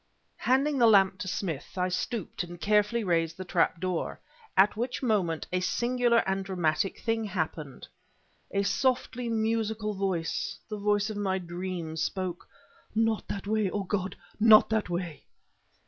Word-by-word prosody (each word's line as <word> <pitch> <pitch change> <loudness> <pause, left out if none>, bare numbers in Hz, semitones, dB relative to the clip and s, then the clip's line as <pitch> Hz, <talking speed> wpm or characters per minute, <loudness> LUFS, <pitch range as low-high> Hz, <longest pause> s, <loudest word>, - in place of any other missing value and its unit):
Handling 275 +2 +2
the 235 - +6
lamp 195 -3 +5
to 190 - -4
Smith, 175 -4 -4
I 180 0 +1
stooped 190 +3 -3
and 175 0 -9
carefully 210 +4 +2
raised 165 -3 0
the 185 - -6
trap 175 -2 +1
door. 180 -1 -2 0.4
At 200 +2 +5
which 245 +4 -3
moment, 190 -9 +1
a 185 - +2
singular 240 +5 +2
and 195 0 0
dramatic 180 -2 0
thing 225 -1 0
happened. 160 -7 -4 0.6
A 200 0 0
softly 245 +1 0
musical 220 -1 0
voice 195 0 -2
the 215 -1 -5
voice 205 +1 +1
of 210 - -6
my 195 -2 0
dreams! 175 -2 -4
spoke. 185 -2 -3 0.5
"Not 225 -1 +1
that 200 - -5
way! 215 -1 +1
O 205 +1 -2
God, 190 -1 -2 0.2
not 220 0 +7
that 220 -4 0
way!" 175 -4 -4
200 Hz, 150 wpm, -28 LUFS, 180-220 Hz, 0.6 s, not